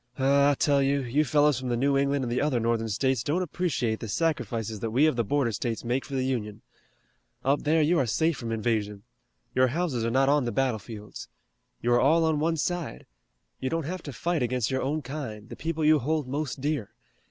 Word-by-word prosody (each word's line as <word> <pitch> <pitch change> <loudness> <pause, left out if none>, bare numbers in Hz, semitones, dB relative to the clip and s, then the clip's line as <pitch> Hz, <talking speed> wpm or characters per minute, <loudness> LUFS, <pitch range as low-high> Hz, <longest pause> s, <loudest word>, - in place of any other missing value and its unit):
Oh, 140 +1 +4
I 145 - +2
tell 140 0 +2
you, 140 0 +1
you 130 +5 +1
fellows 145 -2 +3
from 130 -1 -4
the 120 - 0
New 140 +3 +2
England 140 -1 +1
and 120 - -3
the 125 - 0
other 145 -4 +1
Northern 115 -1 0
States 130 +3 +1
don't 155 +9 0
appreciate 145 -10 -1
the 115 - -6
sacrifices 115 -5 -1
that 115 - -2
we 130 +7 +3
of 155 - +2
the 120 - +1
border 130 +1 +1
states 115 +1 -3
make 125 +3 -1
for 140 - -6
the 130 -1 0
Union. 110 -5 -3 0.8
Up 140 +2 +2
there 155 +1 +3
you 170 +3 +3
are 130 - +1
safe 160 +8 +1
from 115 -3 -5
invasion. 105 -3 -1 0.5
Your 130 0 +4
houses 140 -3 -1
are 115 - 0
not 135 +3 +3
on 145 -2 +3
the 120 - -1
battlefields. 110 -5 -3 0.6
You 120 +1 +3
are 120 - +4
all 160 +4 +4
on 160 -2 +1
one 165 +2 +1
side. 175 +1 -3 0.5
You 130 - -2
don't 165 0 -2
have 180 +3 -4
to 145 - -7
fight 170 +4 -1
against 125 0 0
your 130 - 0
own 150 +3 -1
kind, 125 -6 -6
the - - -7
people 160 -1 -2
you 155 0 +5
hold 150 +1 -1
most 140 0 -3
dear. 145 -7 -2
135 Hz, 220 wpm, -27 LUFS, 120-150 Hz, 0.8 s, you